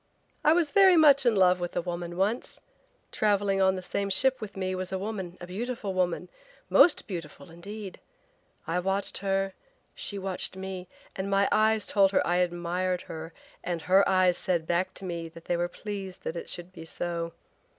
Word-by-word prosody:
"I 305 - +6
was 330 -4 +2
very 385 -2 +7
much 280 -4 +6
in 230 - +4
love 180 -2 +4
with 175 0 -4
a 175 - +1
woman 175 0 -5
once. 210 +6 -1 0.5
Traveling 200 -2 +1
on 190 0 +4
the 185 - -5
same 200 +2 -2
ship 255 +7 +2
with 205 -2 -7
me 185 -1 -1
was 185 0 -4
a 190 - -1
woman, 190 -3 -5
a 175 - -7
beautiful 210 +2 -4
woman, 180 -1 0 0.4
most 340 - +6
beautiful, 165 -5 -8
indeed. 200 +3 -8 0.7
I 170 +2 0
watched 195 +2 -1
her, 195 -1 0 0.4
she 205 - -5
watched 190 -1 -4
me, 190 -1 -6 0.3
and 190 +1 -3
my 195 0 +3
eyes 220 -1 +3
told 195 -1 +3
her - - +3
I 175 +1 +1
admired 180 +1 -1
her 160 0 -7 0.3
and 170 -2 -3
her 190 +2 +5
eyes 185 -2 +4
said 175 -4 0
back 175 +3 0
to 195 - -7
me 170 -2 -4
they 165 +1 -4
were 175 0 0
pleased 195 -1 -7
that 160 - -4
it 170 - -6
should 175 +1 -6
be 165 -3 -10
so. 170 0 -4
185 Hz, 185 wpm, -28 LUFS, 175-200 Hz, 0.7 s, very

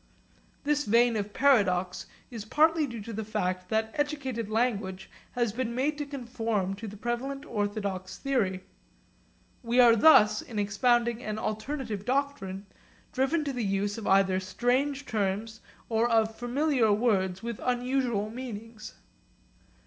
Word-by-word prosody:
This 295 -1 +1
vein 235 +2 +4
of 205 -1 -2
paradox 195 -9 +2 0.2
is 225 -4 -6
partly 310 +6 +3
due 235 -4 -7
to 230 +3 -7
the 220 +1 -3
fact 185 -4 -2
that 220 0 0
educated 270 -7 -2
language 215 -5 -1 0.2
has 240 -4 0
been 235 -1 -3
made 295 +4 0
to 290 - -3
conform 230 -8 -2
to 225 +2 -7
the 205 +1 -9
prevalent 260 +5 -3
orthodox 205 -4 -3
theory. 200 -10 -1 1.0
We 240 +1 +1
are 235 -2 +8
thus, 215 -4 +6
in 225 - -9
expounding 235 +3 +1
an 215 0 -3
alternative 220 0 -4
doctrine, 245 -7 -2 0.5
driven 295 +4 +1
to 280 - -2
the 245 -2 -2
use 200 +1 -1
of 215 - -6
either 190 -1 +4
strange 255 +9 0
terms 215 +1 -2 0.3
or 230 +1 +1
of 225 -1 +2
familiar 245 -1 +1
words 195 -4 +1
with 235 -2 -4
unusual 245 -4 0
meanings. 225 -2 -8
225 Hz, 140 wpm, -28 LUFS, 205-255 Hz, 1.0 s, are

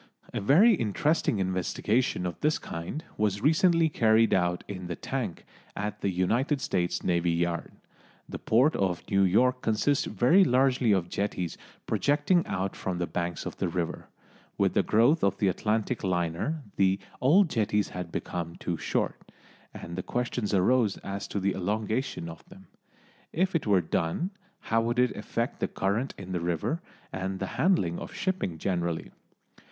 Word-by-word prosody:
A - - -2
very 180 - +6
interesting 150 - +1
investigation 95 +3 0
of 90 - -4
this 150 +1 +2
kind 85 - -6
was 100 -1 0
recently 165 +2 +4
carried 115 -5 +3
out 90 -1 +1
in 90 -3 -6
the 85 - -3
tank - - -4 0.3
at 105 +1 -4
the 100 - +1
United 115 - +1
States 90 -9 -1
Navy 85 -1 +1
Yard. 85 0 -1 0.6
The - - -6
port 130 +8 +3
of 95 -3 -1
New 100 0 +4
York 125 +7 +3
consists 115 +6 +1
very 125 - +4
largely 130 - +3
of 95 -4 +2
jetties 90 -4 -2 0.3
projecting 150 +5 +2
out 95 +1 -2
from 95 -2 -3
the 90 - -1
banks 85 0 -3
of - - -6
the - - -1
river. 85 -1 -3 0.5
With - - +2
the - - +4
growth 120 +9 +3
of 100 0 +2
the 100 - +2
Atlantic 110 +5 -1
liner 90 - -1
the 95 0 +3 0.2
old 170 +10 +5
jetties 105 -3 +1
had 90 -2 -6
become 85 -1 -4
too 85 -2 -3
short, 75 - -2 0.4
and 85 +2 -6
questions 120 -3 -2
arose 105 +2 +3
as 100 +1 -5
to 100 - -3
the 100 +1 +1
elongation 105 +1 -2
of 80 -1 -9
them. - - -14 0.7
If 185 +4 0
it 165 -8 0
were 100 -3 +4
done, 85 - -1 0.3
how 115 0 +1
would 120 +2 -1
it 125 -1 +2
effect - - -3
the - - 0
current 105 +8 -1
in 95 -1 -8
the 90 - -1
river, 85 - -1 0.3
and 95 0 -3
the 95 - -3 0.2
handling 150 - +2
of - - -8
shipping 185 - -2
generally? 85 -1 -2
100 Hz, 160 wpm, -28 LUFS, 90-130 Hz, 0.7 s, very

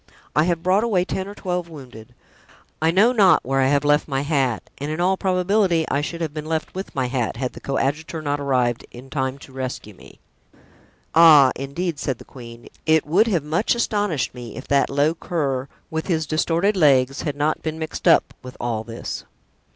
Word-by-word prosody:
I 150 +2 +4
have 170 -2 -1
brought 190 +4 +3
away 195 -6 +1
ten 190 0 -3
or 205 - -9
twelve 180 -3 -3
wounded. 125 -8 -12 0.7
I 160 - +3
know 200 +8 +4
not 205 -7 +4
where 135 +1 +1
I 130 - +3
have 140 +1 +2
left 145 +1 +3
my 135 -2 -1
hat, 135 -6 0
and 145 +2 -4
in 155 +2 -3
all 185 +2 +2
probability 185 -2 +1
I 140 - +1
should 170 +3 -5
have 155 -3 -3
been 155 0 -6
left 160 0 -2
with 190 +1 -7
my 130 -2 0
hat, 125 -3 -2
had 125 0 -3
the - - -10
coadjutor 145 +4 -2
not 145 0 -1
arrived 125 -4 0
in 130 +2 -13
time 130 -2 -2
to 140 - -14
rescue 130 -5 -5
me." - - -17 0.9
"Ah, 155 -5 +8
indeed," 145 +5 -4
said 130 -4 -2
the - - -14
queen, 115 -2 -12 0.2
"it 160 -1 +4
would 185 +9 +3
have 175 -9 0
much 165 +11 0
astonished 205 - -1
me 120 -3 -9
if 130 - -9
that 140 -1 +3
low 145 +3 +2
cur, 140 -6 -2 0.2
with 160 0 -3
his 160 -4 0
distorted 170 +6 +1
legs, 135 -6 +3
had 150 -4 -3
not 150 +2 0
been 160 0 -4
mixed 160 -1 -5
up - - +4
with 125 0 -11
all 115 -2 -2
this." 115 0 -6
150 Hz, 200 wpm, -22 LUFS, 135-170 Hz, 0.9 s, Ah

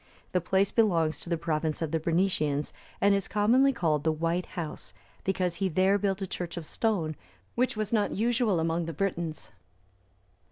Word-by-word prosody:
The 180 - +1
place 190 +3 +1
belongs 170 -9 +2
to - - -9
the 170 - +1
province 155 -1 -1
of 160 -3 -2
the 165 - +1
Bernicians, 160 -4 0 0.3
and 200 0 +4
is 195 -1 0
commonly 240 +7 +4
called 160 - 0
the 160 - +3
White 165 +3 -1
House,(303) 160 -3 -7
because 180 -2 0
he 190 +1 0
there 190 +4 +3
built 195 0 -1
a - - 0
church 175 -1 -5
of 170 - -5
stone, 170 -6 -1 0.4
which 250 -2 0
was 215 0 -2
not 210 -2 +2
usual 225 -3 +1
among 165 +1 0
the 165 - -4
Britons. 170 -2 -3
180 Hz, 175 wpm, -28 LUFS, 165-200 Hz, 0.4 s, and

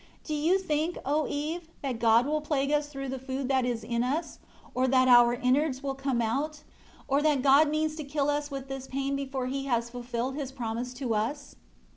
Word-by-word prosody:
Do 310 - -4
you 315 +5 +3
think, 325 -2 -1
O 295 +2 +1
Eve, 315 +4 -3 0.2
that 255 -4 -2
God 230 +1 +5
will 305 +1 0
plague 285 -2 0
us 295 0 +1
through 275 -2 -5
the 265 0 -4
food 265 0 -4
that 260 -2 +2
is 235 -2 -2
in 235 0 -1
us, 295 +7 -2 0.3
or 255 +1 +1
that 255 0 +4
our 240 -1 +7
innards 260 +2 +1
will 275 -1 -1
come 270 -3 -1
out; 290 +6 -2 0.4
or 275 +2 +2
that 295 -4 +2
God 285 +2 +6
means 310 0 0
to 310 - -4
kill 280 0 -1
us 290 0 0
with 275 -2 -6
this 270 -1 -6
pain 275 +1 -2
before 270 -2 -3
He 270 +2 -3
has 235 -3 0
fulfilled 245 +1 -3
His 275 -2 -4
promise 240 -1 -4
to 250 -3 -2
us?" 255 +7 -2
275 Hz, 210 wpm, -28 LUFS, 250-295 Hz, 0.4 s, our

